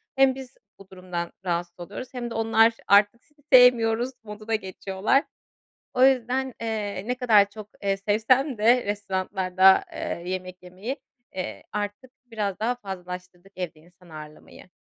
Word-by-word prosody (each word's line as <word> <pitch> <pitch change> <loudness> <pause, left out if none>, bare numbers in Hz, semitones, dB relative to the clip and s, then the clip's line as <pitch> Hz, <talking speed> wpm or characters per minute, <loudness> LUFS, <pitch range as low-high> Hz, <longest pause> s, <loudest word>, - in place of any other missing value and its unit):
Hem 265 -1 +4
biz 265 -2 -10 0.2
bu 195 - -15
durumdan 180 -2 -5
rahatsız 175 0 -3
oluyoruz 245 +9 -8
hem 240 -2 -4
de - - -7
onlar 225 0 +4
artık 205 +4 +4
sizi 295 -1 -30
sevmiyoruz 245 -1 +6
moduna 215 +1 -4
geçiyorlar. 195 - 0 0.7
O 255 - +3
yüzden, 260 0 +1
eee, 210 -2 -3
ne 250 - 0
kadar 215 -5 +4
çok, 210 0 -11
eee, 195 -1 +1
sevsem 225 +6 +1
de 235 +3 +4
restoranlarda 190 -2 +2
eee, 170 - -4
yemek 185 0 -5
yemeyi, 190 +9 -6 0.4
eee, 185 - -5
artık 205 +4 -5
biraz 210 -5 -3
daha 240 +3 0
fazlalaştırdık 180 -3 -9
evde 175 -4 -5
insan 175 +1 -21
ağırlamayı. 155 +3 -12
205 Hz, 140 wpm, -25 LUFS, 185-240 Hz, 0.7 s, sevmiyoruz